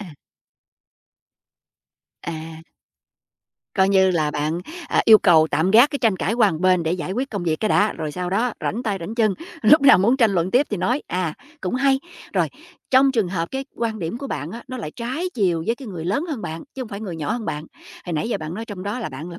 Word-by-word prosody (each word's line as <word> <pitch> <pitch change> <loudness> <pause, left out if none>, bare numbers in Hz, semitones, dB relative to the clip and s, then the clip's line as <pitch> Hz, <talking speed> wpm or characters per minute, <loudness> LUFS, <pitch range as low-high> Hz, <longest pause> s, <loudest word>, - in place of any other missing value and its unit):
À. 185 -7 -9 2.1
À. 160 -1 -7 1.1
Coi 190 -2 +3
như 190 -1 +4
là 155 -4 +1
bạn, 150 +3 -2 0.3
à, - - +2
yêu 220 -1 +9
cầu 160 -5 +5
tạm 160 +6 +1
gác 235 +7 +7
cái 285 - -3
tranh 225 -6 +2
cãi 195 - -1
qua 225 -4 +4
một 160 -2 -4
bên 185 -2 +3
để 160 0 0
giải 180 +1 -3
quyết 260 +5 -2
công 205 -4 -3
việc 160 -2 0
cái 215 - +1
đã, 210 0 +3
rồi 155 -2 -5
sau 180 -1 -4
đó 225 +5 +1
rảnh 235 - -2
tay 210 -5 -1
rảnh 190 +7 -5
chân, 220 -4 +2 0.3
lúc 305 - +7
nào 265 -9 +8
muốn 230 +7 +3
tranh 230 -5 +4
luận 180 0 0
tiếp 265 +6 +3
thì 210 - -1
nói, 245 +9 0
à. 175 -3 -2 0.3
Cũng - - -3
hay. 270 0 +2 0.3
Rồi. - - +1 0.4
Trong 265 +1 +5
trường 220 -7 +1
hợp 170 -2 -2
cái 270 0 -3
quan 225 -2 -2
điểm 175 +7 -4
của 275 - -5
bạn - - -4
á, 235 +1 -8
nó 255 - -5
lại 205 -11 -5
trái 260 +10 -3
chiều 180 -7 +1
với 230 - +1
cái 260 -1 -10
người 175 -5 -6
lớn 210 - 0
hơn 275 -9 -4
bạn, 160 +1 -5
chứ 265 - -4
hông 245 - -8
phải 200 -2 -7
người 190 -6 -5
nhỏ 150 -2 -2
hơn 235 -1 -3
bạn. 150 -6 -4 0.4
Hồi 175 - -3
nãy 155 +8 -1
giờ - - 0
bạn 155 +1 -6
nói 225 +4 -5
trong 205 -5 -8
đó 205 +5 -3
là 230 - -4
bạn 155 +5 -8
là 170 - -9
200 Hz, 245 wpm, -22 LUFS, 170-235 Hz, 2.1 s, yêu